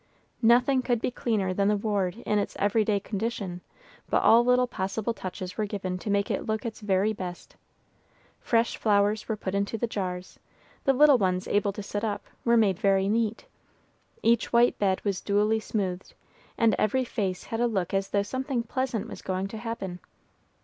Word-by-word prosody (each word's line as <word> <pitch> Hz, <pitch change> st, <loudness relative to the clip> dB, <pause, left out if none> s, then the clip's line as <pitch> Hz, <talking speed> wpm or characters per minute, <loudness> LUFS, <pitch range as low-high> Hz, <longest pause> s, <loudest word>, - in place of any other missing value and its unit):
Nothing 245 Hz, +3 st, +4 dB
could 245 Hz, -2 st, 0 dB
be 250 Hz, -, -1 dB
cleaner 210 Hz, -7 st, -1 dB
than 200 Hz, +1 st, +1 dB
the 210 Hz, 0 st, +3 dB
ward 200 Hz, -2 st, -1 dB
in 210 Hz, -, +2 dB
its 205 Hz, -, -3 dB
every 205 Hz, +2 st, +2 dB
day 210 Hz, -1 st, +1 dB
condition, 200 Hz, -3 st, -4 dB, 0.5 s
but -, -, +2 dB
all 230 Hz, +1 st, +7 dB
little 250 Hz, +1 st, +4 dB
possible 220 Hz, 0 st, -3 dB
touches 185 Hz, -1 st, -7 dB
were 215 Hz, -, 0 dB
given 190 Hz, -3 st, -4 dB
to 210 Hz, -, -5 dB
make 200 Hz, 0 st, +1 dB
it -, -, -2 dB
look 220 Hz, +3 st, -2 dB
its 225 Hz, -1 st, -5 dB
very 205 Hz, +1 st, +1 dB
best. 180 Hz, -3 st, -7 dB, 0.8 s
Fresh 230 Hz, 0 st, +1 dB
flowers 205 Hz, 0 st, +2 dB
were 220 Hz, -, 0 dB
put 190 Hz, -2 st, -4 dB
into 200 Hz, +3 st, -1 dB
the 230 Hz, -, 0 dB
jars, 185 Hz, -5 st, -5 dB, 0.5 s
the 270 Hz, -, +4 dB
little 285 Hz, -1 st, +6 dB
ones 185 Hz, -2 st, 0 dB
able 205 Hz, 0 st, +1 dB
to 205 Hz, -, -6 dB
sit 205 Hz, +1 st, -4 dB
up, 210 Hz, -2 st, -2 dB, 0.2 s
were 235 Hz, 0 st, +4 dB
made 200 Hz, -4 st, +3 dB
very 195 Hz, -1 st, +3 dB
neat, 225 Hz, +1 st, 0 dB, 0.8 s
each 230 Hz, 0 st, +2 dB
white 240 Hz, +1 st, +4 dB
bed 190 Hz, -1 st, 0 dB
was 200 Hz, -3 st, -1 dB
duly 210 Hz, +2 st, +2 dB
smoothed, 190 Hz, -4 st, -3 dB, 0.4 s
and 230 Hz, -1 st, +4 dB
every 255 Hz, +5 st, +2 dB
face 195 Hz, -6 st, -2 dB
had 225 Hz, -, -4 dB
a 240 Hz, -, +3 dB
look 195 Hz, -6 st, -2 dB
as 195 Hz, 0 st, 0 dB
though 200 Hz, -1 st, +1 dB
something 260 Hz, +2 st, -2 dB
pleasant 235 Hz, -2 st, -2 dB
was -, -, -9 dB
going 185 Hz, 0 st, -2 dB
to 220 Hz, -, -7 dB
happen. 205 Hz, -6 st, -5 dB
210 Hz, 185 wpm, -27 LUFS, 195-230 Hz, 0.8 s, all